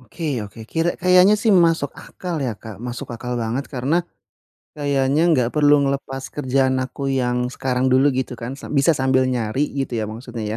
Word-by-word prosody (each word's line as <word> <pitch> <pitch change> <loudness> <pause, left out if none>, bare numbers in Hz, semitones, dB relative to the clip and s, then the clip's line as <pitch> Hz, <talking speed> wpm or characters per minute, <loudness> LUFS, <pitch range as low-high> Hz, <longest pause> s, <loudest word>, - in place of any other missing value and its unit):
Oke 130 +1 -4
oke. 105 +2 -10
Kira 165 +6 0
kayaknya 185 +3 +5
sih 220 +1 +2
masuk 165 -5 +3
akal 180 -2 -6
ya, 125 -3 -1
Kak. 110 -2 -9
Masuk 125 +3 -5
akal 125 +1 -4
banget 120 +4 -2
karena 145 +6 0 0.7
kayaknya 140 0 +1
enggak 130 -8 +3
perlu 145 -1 +5
ngelepas 135 -1 -3
kerjaan 130 -2 +1
aku 135 +1 -5
yang 125 0 0
sekarang 125 0 -1
dulu 135 +3 +4
gitu, 130 -1 -3
kan? 115 +1 -6
Sa - - -9
bisa 140 +2 +3
sambil 130 -3 +2
nyari 125 +4 -1
gitu 135 -3 -3
ya - - -1
maksudnya, 115 +2 -6
130 Hz, 175 wpm, -21 LUFS, 125-145 Hz, 0.7 s, kayaknya